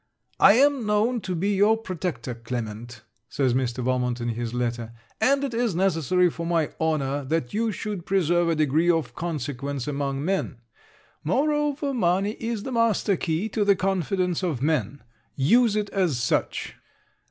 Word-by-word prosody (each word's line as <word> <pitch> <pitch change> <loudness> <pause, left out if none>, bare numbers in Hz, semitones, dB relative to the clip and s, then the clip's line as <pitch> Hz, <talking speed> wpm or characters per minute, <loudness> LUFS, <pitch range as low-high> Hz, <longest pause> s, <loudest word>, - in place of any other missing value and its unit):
'I 200 - +8
am 275 0 +3
known 220 +3 +1
to 185 -1 -3
be 195 +5 0
your 205 +3 +4
protector, 175 - -4
Clement,' 115 0 -6 0.3
says 130 -3 +1
Mr. 125 -1 -1
Valmont 125 -1 0
in 120 0 -2
his 115 0 -3
letter; 120 -1 -3 0.3
'and 275 +1 +3
it 270 -4 -2
is 230 -5 0
necessary 180 0 +2
for 170 0 -4
my 165 -2 0
honour 145 -3 0
that 135 -3 -2
you 225 +1 0
should 205 -3 -5
preserve 175 -2 +2
a 165 - +2
degree 155 +3 +2
of 165 -2 +1
consequence 140 -4 -4
among 140 -1 -2
men. 190 -9 -1 0.7
Moreover, 290 - 0
money 195 -2 +1
is 225 -2 -3
the 265 - -5
master 230 -4 +2
key 170 +4 -1
to 210 0 0
the 200 -1 +4
confidence 185 -1 -1
of 165 -9 -1
men. 140 -3 -1 0.3
Use 220 - +3
it 210 -1 -1
as 180 -9 +1
such. 120 - -1
170 Hz, 160 wpm, -25 LUFS, 135-205 Hz, 0.7 s, I